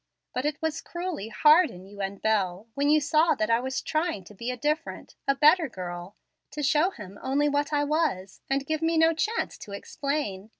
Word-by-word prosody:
But 255 +2 -2
it 300 -1 -1
was 320 -1 -1
cruelly 345 - -5
hard 305 +9 +5
in 180 +1 -11
you 200 +1 -9
and 195 0 -4
Bel, 200 -2 0
when 285 +1 +1
you 305 +1 +6
saw 310 +2 +3
that 215 +1 0
I 230 - +4
was 265 +2 -3
trying 315 - -1
to 195 - -14
be 235 +5 -5
a 250 - -3
different 300 +5 -2
a 275 - +3
better 310 +2 +5
girl, 180 -1 -7 0.3
to 295 0 -5
show 305 +5 +3
him 205 - -11
only 280 +3 +1
what 290 +1 0
I 290 -1 +2
was, 290 - -1
and 275 0 0
give 315 +1 -2
me 325 0 +1
no 325 +1 +5
chance 430 +8 -2
to 200 - -9
explain. 215 -3 -3
280 Hz, 210 wpm, -27 LUFS, 205-310 Hz, 0.3 s, you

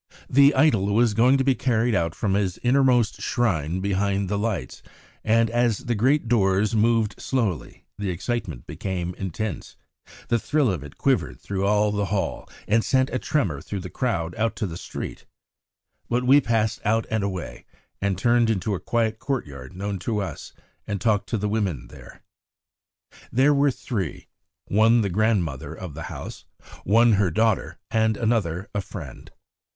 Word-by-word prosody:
The 140 +2 +5
idol 110 -9 +3
was 115 -1 +3
going 125 +5 +4
to 135 - +1
be 135 0 +3
carried 120 -2 +1
out 85 -3 0
from 100 -3 -1
his 95 -3 0
innermost 125 -3 +3
shrine 95 - 0
behind 100 0 0
the 100 0 -1
lights; 105 - -3 0.4
and 115 +1 +3
as 120 -2 +1
the 125 -2 -3
great 130 +4 +2
doors 105 -2 +2
moved 110 -1 +2
slowly, 115 - -2
the 100 -2 -2
excitement 90 - -3
became 90 -2 -4
intense, 95 -1 -5 0.5
the 120 - +2
thrill 145 -1 +1
of 85 -7 -4
it 75 - -12
quivered - - 0
through 100 0 -2
all 105 0 +3
the 105 -1 -1
hall 100 0 -2 0.2
and 110 +2 +3
sent 130 0 +2
a 130 - -1
tremor 100 - -1
through 100 +3 -5
the 90 - -8
crowd 95 -10 -1
out 115 0 0
to 110 - -2
the 85 -4 -5
street. - - -7 0.8
But 120 +1 +1
we 140 +3 +6
passed 110 -3 0
out 110 +2 +1
and 110 -2 0
away, 95 -4 -5 0.4
and 100 -2 0
turned 120 +2 +3
into 105 -1 0
a 95 - -2
quiet 110 -2 -1
courtyard 70 - -4
known 100 0 -3
to 110 +4 -2
us 100 - -5 0.4
and 100 -1 -2
talked 105 +1 +1
to 115 - 0
the 105 0 -1
women 95 - -2
there. - - -14 1.1
There 135 +4 +4
were 140 0 +3
three, 105 - -4 0.4
one 115 +3 +4
the 100 - 0
grandmother 85 - 0
of 90 -2 -8
the 80 - -7
house, - - -8 0.4
one 115 +4 +5
her 100 -3 +3
daughter, 110 +6 0
and 110 -1 +2
another 105 -6 0
a 100 - -1
friend. 80 -9 -9
105 Hz, 165 wpm, -24 LUFS, 95-120 Hz, 1.1 s, we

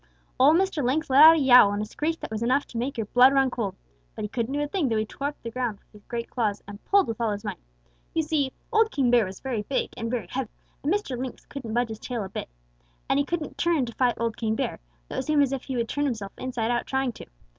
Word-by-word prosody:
"Old 290 +5 +6
Mr. 375 -6 0
Lynx 280 +4 0
let 270 +2 +7
out 320 +1 +10
a - - +1
yowl 250 -7 +7
and 205 - -2
a - - -3
screech 315 +9 -3
that - - -6
was 220 0 -3
enough 255 +5 +2
to 235 - -8
make 255 +3 -3
your 225 - -1
blood 250 +5 +6
run 270 -1 +3
cold. 210 -6 -3 0.4
But - - -5
he 210 - -3
couldn't 235 +3 -2
do - - 0
a 295 - -1
thing, 305 -4 0
though 225 - +1
he 215 - 0
tore 285 +6 -4
the 230 - -5
ground 245 -4 -2
up - - -32
with - - -39
his - - -38
great 235 -1 -4
claws 215 -5 -2
and 205 0 -10
pulled 400 -1 +4
with 230 +1 -4
all 230 - +1
his 205 +1 -4
might. 205 -5 -5 0.6
You 325 - +2
see, 295 -4 0 0.2
old 445 0 +4
King 265 - +1
Bear 240 -3 +5
was 190 0 -9
very 250 -5 -2
big 260 +6 -2
and 230 -2 -4
very 235 -5 -2
heavy, 250 +5 -4 0.3
and 290 - 0
Mr. 400 -10 -1
Lynx 255 +1 -6
couldn't 235 -6 -6
budge 240 -1 +1
his 220 -1 -6
tail 240 -4 -4
a 190 - -7
bit. - - -6 0.6
And 275 - +2
he 285 - +1
couldn't 305 -4 -4
turn 335 -6 +2
to 235 - -8
fight 245 0 +2
old 230 -1 -2
King 220 -2 -1
Bear, - - -2 0.3
though - - -6
it - - +1
seemed 300 -2 +3
as 275 -1 -1
if 265 - -4
he 265 - -4
would 235 -1 -1
turn 290 +5 -1
himself 215 -7 -3
inside 245 -3 -2
out 240 - -1
trying 265 -1 0
to. - - -12
250 Hz, 285 wpm, -26 LUFS, 225-285 Hz, 0.6 s, out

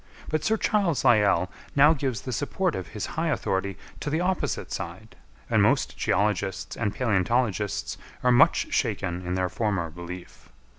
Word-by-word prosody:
But 155 -1 0
Sir 220 +6 +2
Charles 200 -9 +1
Lyell 100 -5 +4 0.2
now 145 +3 +7
gives 130 -7 -2
the 130 - -5
support 170 - -1
of 90 - -4
his 105 - -5
high 165 +1 -2
authority 100 - -1 0.2
to - - -3
the 155 +2 0
opposite 180 +1 -1
side, - - -6 0.3
and - - +3
most - - +2
geologists 100 +1 0
and 105 -3 -2
palæontologists 110 -2 0 0.3
are 125 - +4
much 120 - +4
shaken 90 +1 -1
in 90 0 -2
their 95 0 +1
former 95 -5 -1
belief. 90 +2 -9
105 Hz, 155 wpm, -26 LUFS, 95-145 Hz, 0.3 s, now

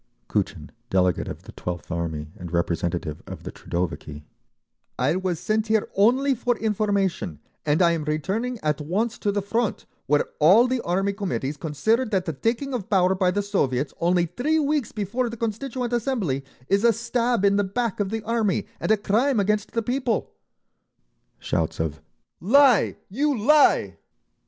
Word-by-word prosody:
Kutchin, - - -2 0.2
delegate 90 -2 +1
of - - -7
the - - -11
12th 90 0 -6
Army 80 -3 -3
and 85 -2 -8
representative 85 -2 -1
of - - -8
the - - -6
Troudoviki: 85 -4 -4 0.7
"I 135 +6 +1
was 185 -3 -1
sent 215 +3 0
here 220 -1 +2
only 255 +7 +4
for 245 -1 0
information, 200 - -1 0.3
and 150 +5 +3
I 170 - +5
am 165 -3 -2
returning 195 +11 -1
at 150 -1 0
once 210 +10 -1
to 205 - 0
the 200 -1 -1
Front, 225 +2 -1 0.2
where 145 +1 +3 0.2
all 190 +11 +7
the 255 -1 0
Army 195 +2 0
Committees 180 -8 -3
consider 165 - +1
that 195 -6 -1
the 160 - -2
taking 235 - -1
of 225 -7 -4
power 185 -2 +4
by 185 -1 +2
the 205 +2 0
Soviets, 140 -9 0
only 175 0 +3
three 285 - 0
weeks 295 -5 0
before 230 +4 -2
the 230 - -7
Constituent 240 +2 -3
Assembly, 225 - -1 0.2
is 200 +2 +2
a 235 - +6
stab 235 -1 0
in 200 0 +4
the 205 - +3
back 225 +2 -2
of 200 -2 0
the 220 0 -3
Army 220 -4 0
and - - -3
a 220 - +5
crime 225 +5 +2
against 210 +1 0
the 230 - 0
people—!" 245 -2 -1 1.1
Shouts 80 -1 -2
of 80 -2 -2 0.4
"Lie! 250 +2 +4
You 280 +6 0
lie!" 295 +7 +4
205 Hz, 165 wpm, -24 LUFS, 155-235 Hz, 1.1 s, all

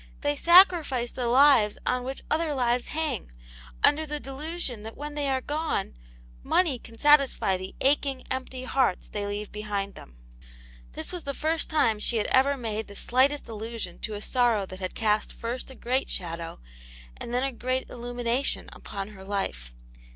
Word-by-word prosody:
They 290 0 +1
sacrifice 330 -7 +5
the 245 -2 -2
lives 245 -4 +5
on 250 0 +1
which 265 +2 -5
other 310 -1 +1
lives 245 -1 +1
hang, 305 - -2 0.5
under 305 +2 +5
the 300 -1 -4
delusion 275 -3 -5
that 220 +1 -8
wheni 295 +1 -6
they 290 -1 -1
are 265 -1 +1
gone 300 -7 -2 0.5
money 310 - +2
can 230 0 -13
satisfy 280 -8 +4
the 185 +1 -6
aching, 275 -1 +1
empty, 260 0 -4
hearts 255 -7 +1
they 205 -1 -3
leave 205 0 -4
behind 205 -2 -3
them." - - -14 0.8
This - - -5
was 355 -2 -5
the 280 -1 -4
first 320 +1 -1
time 230 -9 +3
she 230 +2 +1
had 215 - +1
ever 275 +2 +4
made 220 -3 -3
the 200 - -11
slightest 265 +7 +2
allusion 220 -4 -6
to 215 - -4
a 205 - -5
sorrow 240 -5 +2
that 185 0 -10
had 185 -1 -4
cast 215 -1 +1
first 240 +3 -5
a 265 - -11
great 255 +3 -1
shadow 170 -2 -5 0.6
and - - -7
then 250 +1 +1
a 270 - 0
great 255 +1 -2
illumination 245 +2 -2
upon 195 0 -6
her 195 -3 -12
life. 125 - -3
250 Hz, 175 wpm, -27 LUFS, 210-280 Hz, 0.8 s, sacrifice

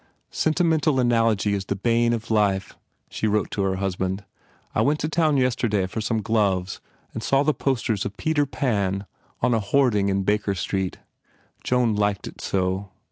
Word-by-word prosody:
Sentimental 160 -3 +2
analogy 115 -4 +2
is 100 -1 -2
the 100 - -2
bane 115 +3 +2
of 115 -1 -3
life," 100 -3 +1 0.3
she 110 - -2
wrote 105 -1 0
to 100 - -2
her 95 -1 +1
husband, 95 0 -2 0.5
"I - - +2
went 150 +2 +2
to 155 - 0
town 155 -2 +2
yesterday 120 -6 +1
for 100 +4 -4
some 110 0 -1
gloves 95 -4 0 0.3
and 115 - -4
saw 135 +4 +2
the 155 +1 +2
post 130 -5 -1
ers 105 -4 0
of 100 0 -6
Peter 150 -2 +1
Pan 100 -8 -1 0.4
on 125 0 +3
a 115 - +2
hoarding 105 -2 +2
in 95 0 0
Baker 105 0 0
Street. 95 0 -2 0.7
Joan 125 -3 +2
liked 100 -1 0
it - - -9
so. 95 +1 -1
105 Hz, 175 wpm, -24 LUFS, 100-125 Hz, 0.7 s, on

